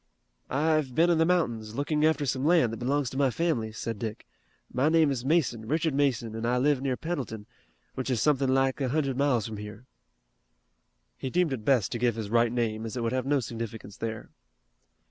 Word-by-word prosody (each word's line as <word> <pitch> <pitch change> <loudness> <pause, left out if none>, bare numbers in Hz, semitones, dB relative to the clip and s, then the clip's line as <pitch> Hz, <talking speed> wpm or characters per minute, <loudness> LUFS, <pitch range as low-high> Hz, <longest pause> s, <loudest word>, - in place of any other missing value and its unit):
"I've 150 -2 +1
been 170 +2 +4
in 165 - +2
the 160 - +4
mountains, 115 -12 0
looking 150 +2 0
after 155 -2 +1
some 130 0 -1
land 155 -8 +3
that - - -4
belongs 135 +1 0
to 130 - -6
my 140 -1 +3
family," 125 -7 -1
said 115 0 -5
Dick. 110 -1 -5 0.5
"My 135 +5 +2
name 160 -3 +4
is 125 -3 -3
Mason, 130 -7 +1
Richard 160 +2 0
Mason, 130 -5 0
and 115 +1 -3
I 125 +1 +2
live 140 +1 +2
near 135 -2 -1
Pendleton, 130 -11 -4 0.5
which 130 0 -4
is 125 -3 +1
something 135 +2 +2
like 135 +1 +2
a 130 - 0
hundred 140 -1 0
miles 130 -5 +1
from 110 -1 -6
here." 105 +3 -9 1.3
He 130 - -3
deemed 175 -1 +1
it 115 -5 -5
best 120 -5 +2
to 120 - -3
give 120 -2 +2
his 110 -2 -5
right 115 0 +3
name, 115 -2 -1
as 115 +2 -5
it 120 - -2
would 115 - 0
have 130 0 -1
no 145 0 +3
significance 115 -2 -6
there. 110 -1 -5
130 Hz, 205 wpm, -28 LUFS, 115-145 Hz, 1.3 s, been